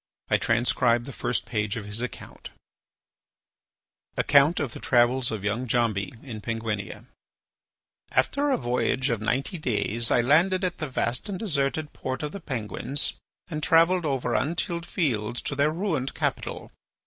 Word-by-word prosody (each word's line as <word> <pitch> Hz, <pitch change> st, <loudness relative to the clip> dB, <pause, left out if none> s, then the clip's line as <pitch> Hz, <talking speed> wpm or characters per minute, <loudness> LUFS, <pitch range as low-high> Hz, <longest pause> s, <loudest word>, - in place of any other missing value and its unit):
I -, -, +6 dB
transcribe 120 Hz, 0 st, +2 dB
the 140 Hz, -, -6 dB
first 120 Hz, -, -1 dB
page 105 Hz, -2 st, -1 dB
of 105 Hz, -, -5 dB
his 105 Hz, +2 st, -1 dB
account: 125 Hz, -, -7 dB, 1.7 s
ACCOUNT 145 Hz, +4 st, +5 dB
OF 140 Hz, -6 st, -2 dB
THE -, -, -7 dB
TRAVELS 125 Hz, +1 st, +3 dB
OF 110 Hz, -3 st, -4 dB
YOUNG 110 Hz, +5 st, -1 dB
DJAMBI 115 Hz, -3 st, 0 dB
IN 115 Hz, -6 st, -7 dB
PENGUINIA 110 Hz, -3 st, -4 dB, 1.1 s
After 290 Hz, +1 st, +2 dB
a 275 Hz, -, +3 dB
voyage 125 Hz, +2 st, 0 dB
of 115 Hz, -2 st, -1 dB
ninety 135 Hz, +9 st, -1 dB
days 115 Hz, -3 st, 0 dB
I 120 Hz, -, +4 dB
landed 170 Hz, +9 st, +3 dB
at 180 Hz, -1 st, -1 dB
the 155 Hz, -3 st, -3 dB
vast 125 Hz, +4 st, -1 dB
and 195 Hz, -, -3 dB
deserted 150 Hz, -5 st, -1 dB
port 130 Hz, +3 st, -4 dB
of 150 Hz, -, -3 dB
the 200 Hz, -, -6 dB
Penguins 130 Hz, -, -2 dB, 0.3 s
and 155 Hz, -3 st, -4 dB
travelled 165 Hz, +2 st, +4 dB
over 130 Hz, -4 st, -1 dB
untilled 170 Hz, +2 st, -1 dB
fields 120 Hz, -, -1 dB
to 145 Hz, -, -2 dB
their 145 Hz, +2 st, +3 dB
ruined 160 Hz, -6 st, -2 dB
capital. -, -, -3 dB
130 Hz, 150 wpm, -26 LUFS, 115-155 Hz, 1.7 s, I